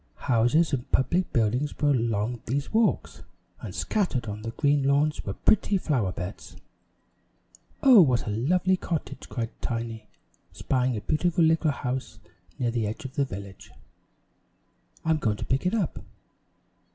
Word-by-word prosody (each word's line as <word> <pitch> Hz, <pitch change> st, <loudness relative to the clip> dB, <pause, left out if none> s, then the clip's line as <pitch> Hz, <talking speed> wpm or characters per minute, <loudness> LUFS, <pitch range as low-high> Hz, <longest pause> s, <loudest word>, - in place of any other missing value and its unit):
Houses 130 Hz, +6 st, +3 dB
and 125 Hz, -2 st, -3 dB
public 170 Hz, +8 st, +1 dB
buildings 120 Hz, +6 st, 0 dB
were 145 Hz, -1 st, +2 dB
along 115 Hz, -2 st, 0 dB
these 140 Hz, -, -2 dB
walks; 225 Hz, 0 st, +1 dB, 0.4 s
and -, -, -8 dB
scattered 180 Hz, -, -1 dB
on 105 Hz, 0 st, -5 dB
the 115 Hz, -, -4 dB
green 145 Hz, +4 st, +1 dB
lawns 140 Hz, +2 st, +1 dB
were 100 Hz, -, -4 dB
pretty 205 Hz, -1 st, +2 dB
flower 130 Hz, -, 0 dB
beds. 90 Hz, +2 st, -7 dB, 1.3 s
"Oh, 255 Hz, -7 st, +9 dB
what 130 Hz, -7 st, +2 dB
a 105 Hz, -, -2 dB
lovely 180 Hz, -, +1 dB
cottage!" 165 Hz, -3 st, -5 dB
cried 115 Hz, -3 st, -3 dB
Tiny, 115 Hz, -2 st, -4 dB, 0.5 s
spying 125 Hz, -2 st, 0 dB
a -, -, -4 dB
beautiful 170 Hz, -, +1 dB
little 160 Hz, 0 st, +3 dB
house 130 Hz, -4 st, -3 dB, 0.4 s
near 120 Hz, -2 st, 0 dB
the 115 Hz, -3 st, -1 dB
edge 125 Hz, +8 st, -6 dB
of 130 Hz, -, -6 dB
the 140 Hz, -1 st, +1 dB
village. 100 Hz, -3 st, -9 dB, 1.4 s
"I'm 160 Hz, -1 st, +3 dB
going 110 Hz, -7 st, 0 dB
to -, -, -5 dB
pick 135 Hz, +7 st, 0 dB
it 195 Hz, -, 0 dB
up! 195 Hz, -9 st, -1 dB
130 Hz, 150 wpm, -26 LUFS, 115-160 Hz, 1.4 s, Oh